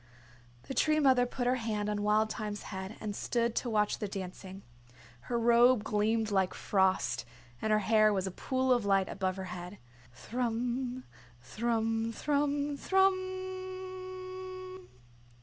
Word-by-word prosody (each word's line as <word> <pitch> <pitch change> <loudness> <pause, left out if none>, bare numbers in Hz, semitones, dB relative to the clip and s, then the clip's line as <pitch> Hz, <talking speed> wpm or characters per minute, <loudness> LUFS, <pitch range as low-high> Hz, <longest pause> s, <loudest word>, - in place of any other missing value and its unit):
The - - -6
Tree 310 +3 +3
Mother 260 -4 +4
put 245 0 -3
her 250 +1 +2
hand 215 -3 -2
on 210 -1 -1
Wild 215 +1 +2
Thyme's 210 -1 -4
head 190 +3 -5
and 210 -2 -4
stood 235 +1 0
to 245 - 0
watch 210 -2 +1
the 210 - -2
dancing. 190 0 -7 0.7
Her 240 - +1
robe 235 0 +5
gleamed 215 +1 +1
like 190 -2 +1
frost, 190 -2 +1 0.4
and 220 - 0
her 215 - +5
hair 215 +1 +4
was 195 -2 0
a 190 - -3
pool 260 +6 +1
of 240 -3 +1
light 195 -1 +3
above 190 -1 -2
her 190 - -5
head. 180 +2 -7 0.3
Thrum, 245 - -2 0.4
thrum, 225 - 0
thrum, 290 +1 0
thrummmmmmmmm. 370 0 -2
230 Hz, 140 wpm, -31 LUFS, 205-285 Hz, 0.7 s, robe